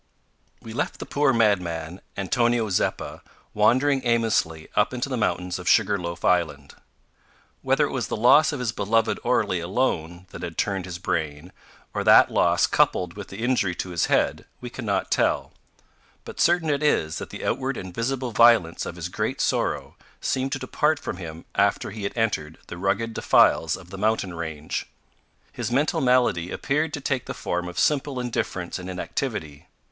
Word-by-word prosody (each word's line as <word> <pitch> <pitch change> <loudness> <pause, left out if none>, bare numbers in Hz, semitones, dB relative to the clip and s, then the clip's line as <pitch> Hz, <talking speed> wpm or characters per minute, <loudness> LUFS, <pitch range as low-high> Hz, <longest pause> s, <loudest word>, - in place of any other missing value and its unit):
We 110 - -8
left - - -2
the - - -7
poor 145 -1 +2
madman, 90 -7 0 0.2
Antonio 115 +3 +1
Zeppa, 90 - -1 0.3
wandering 130 +6 +3
aimlessly 110 -10 +1
up 105 +4 +2
into 125 +2 -2
the 130 - -1
mountains 90 -5 -1
of 90 - -2
Sugar 100 -1 +3
loaf 85 0 -5
Island. 75 -6 +1 0.9
Whether - - +2
it - - -4
was - - -2
the - - -3
loss 130 +8 +5
of 145 - -4
his 125 -3 -1
beloved 115 +1 +1
Orley 90 - +1
alone 85 -3 -2
that - - -9
had 85 - -6
turned 95 -3 -1
his 90 -2 -6
brain, 80 -1 -3 0.4
or - - -1
that - - +7
loss - - +3
coupled 90 -2 +1
with 100 -1 -8
the 100 +4 -7
injury 120 -8 +1
to 90 - -5
his 85 -2 0
head, - - +1
we 125 -1 -8
cannot 105 -7 -2
tell, - - +1 0.7
but - - -9
certain 170 -2 +3
it 140 0 0
is 80 - +1
that - - -7
the - - -7
outward 135 0 -1
and 95 -1 -7
visible 125 +3 -2
violence 115 -7 +4
of - - -6
his 85 -1 -4
great 90 - -3
sorrow - - -1 0.2
seemed 135 +1 -1
to - - -1
depart 150 +4 0
from 100 - -5
him 85 -2 -8
after 100 0 +1
he 105 -1 -6
had 100 - -4
entered 80 -9 -1
the 90 - -8
rugged 115 +4 0
defiles 80 -5 +3
of 90 -1 -15
the 95 - -7
mountain 105 -3 0
range. 80 -2 -4 0.6
His - - -4
mental 140 +5 +1
malady 125 -10 +2
appeared 150 +8 -1
to 145 - -4
take 130 -2 -2
the - - -5
form 90 0 -3
of 90 - -8
simple 145 -3 +1
indifference 95 -8 -3
and 90 0 -7
inactivity. 95 - -4
100 Hz, 175 wpm, -24 LUFS, 90-125 Hz, 0.9 s, that